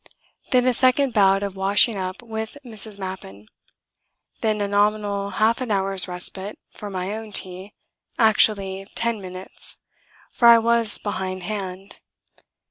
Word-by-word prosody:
Then 250 -2 +3
a 255 - +3
second 255 +1 +2
bout 195 -1 +4
of 200 -1 -4
washing 200 +4 +3
up 185 +3 -5
with 220 +2 -6
Mrs. 220 -3 -4
Mappin. 185 - -8 0.9
Then 215 -1 0
a 205 - -1
nominal 205 0 0
half 225 +5 +1
an 250 - -3
hour's 195 -2 +1
respite 190 +3 -2 0.2
for 205 - -8
my 190 +1 -4
own 220 -1 -8
tea 190 +1 0 0.4
actually 200 -3 +2
ten 230 -2 0
minutes, 185 0 -9 0.5
for 235 - +3
I 235 0 +9
was 230 -1 +3
behindhand. 190 0 -5
205 Hz, 130 wpm, -22 LUFS, 190-220 Hz, 0.9 s, I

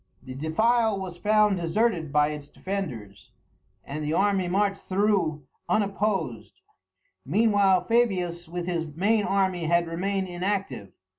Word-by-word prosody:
The 130 0 -8
defile 220 - +1
was 185 -2 -6
found 210 -1 +3
deserted 170 -2 0
by 150 0 +3
its 150 -1 -7
defenders, 115 - -6 0.6
and 150 +2 -5
the 150 +1 -1
army 195 0 +2
marched 195 +2 0
through 185 -7 0 0.2
unopposed. 200 +1 -1 0.6
Meanwhile 200 -4 +3
Fabius 180 -7 0
with 175 0 -4
his 170 -2 -2
main 200 +8 +1
army 190 -3 0
had 170 +1 +2
remained 190 +3 -2
inactive. 180 - -3
185 Hz, 125 wpm, -26 LUFS, 165-205 Hz, 0.6 s, found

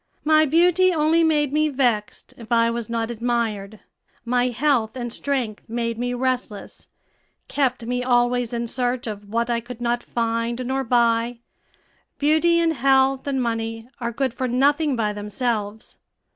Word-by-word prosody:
My 310 0 +4
beauty 355 +4 +4
only 325 0 +3
made 295 -3 +2
me 305 0 +2
vexed 245 -7 -1
if 230 -1 -13
I 230 0 +3
was 235 -1 -4
not 230 0 -2
admired; 220 -3 -2 0.4
my 245 +1 +2
health 245 -2 0
and 240 -2 -4
strength 255 -7 -2
made 230 0 -2
me 245 0 -2
restless, 250 -5 -3 0.6
kept 260 -4 -1
me 250 +1 -2
always 245 -1 +1
in 235 0 -2
search 245 +1 -2
of 205 -2 -7
what 235 +2 0
I 235 - +1
could 240 0 -9
not 240 0 0
find 235 +1 -2
nor 265 +2 -1
buy. 235 -1 +1 0.8
Beauty, 315 +3 +3
and 330 -1 +2
health, 270 0 +2
and 275 -1 0
money 225 0 -3
are 235 -1 -2
good 260 +1 -1
for 260 0 -2
nothing 280 +4 +2
by 215 -3 -1
themselves. 210 0 -4
245 Hz, 155 wpm, -23 LUFS, 230-270 Hz, 0.8 s, My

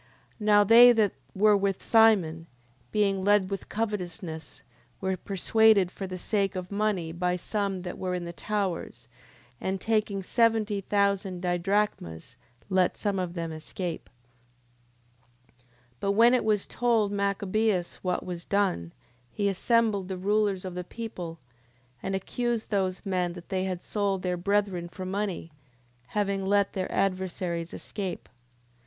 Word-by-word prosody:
10:20. - - -4
Now 205 -1 +7
they 235 +4 +9
that 215 -3 +3 0.2
were 210 +2 +5
with 195 -1 0
Simon, 190 -8 +4 0.4
being 195 -2 +1
led 205 -1 +3
with 195 - -5
covetousness, 180 -7 -4 0.4
were 190 -1 -1
persuaded 200 +1 +3
for 195 - -6
the 185 0 -5
sake 195 +1 -1
of 185 0 -5
money 200 -5 0
by 180 +1 0
some 195 0 -2
that 180 - -6
were 185 -1 -2
in 180 - -3
the 170 0 -6
towers: 185 - -3 0.5
and 190 0 -2
taking 210 -2 0
seventy 220 -1 +2
thousand 195 -2 0
didrachmas, 175 - -1 0.3
let 185 -2 +2
some 200 -2 -1
of 180 -1 -3
them 165 -1 -3
escape. 160 +2 -6 1.5
10:21. 120 - -32 0.3
But 200 - 0
when 230 +4 +6
it 255 - +3
was 210 -2 +2
told 225 -4 +1
Machabeus 200 -1 0
what 180 -1 -2
was 175 -2 -5
done, 185 - 0 0.4
he 205 - -1
assembled 205 0 +1
the 190 -1 -4
rulers 200 0 +1
of 185 - -5
the 180 0 -4
people, 180 -5 -7 0.6
and 195 0 -2
accused 235 +4 -2
those 190 -1 -1
men 180 -3 0
that 175 -1 -11
they 190 -1 -1
had 185 -2 -4
sold 200 -3 -1
their 180 -1 0
brethren 190 -1 0
for 185 +1 -7
money, 190 -3 -3 0.7
having 200 -1 0
let 200 +1 +2
their 185 -1 -3
adversaries 185 -3 -1
escape. 190 - -5
10:22. - - -31
195 Hz, 145 wpm, -28 LUFS, 180-205 Hz, 1.5 s, they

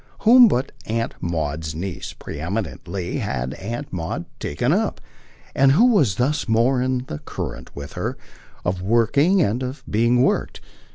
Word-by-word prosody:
Whom 240 +2 +8
but 130 - 0 0.2
Aunt 115 +1 -1
Maud's 80 -2 -2
niece, 90 +1 -5
pre - - -8
eminently, 90 0 -3
had 60 +2 -2
Aunt 115 - -6
Maud 80 -3 -3
taken 75 - 0
up, - - 0 0.5
and 135 0 +5
who 220 - +5
was 140 - +3
thus 135 +4 0
more 120 +3 +3
in 130 0 -1
the 75 - -5
current, - - -6
with 70 0 -7
her, - - -3 0.5
of 90 0 -1
working 120 - +3
and 110 +5 0
of 130 +3 -5
being 120 +3 +3
worked? - - 0
115 Hz, 155 wpm, -22 LUFS, 85-130 Hz, 0.5 s, Whom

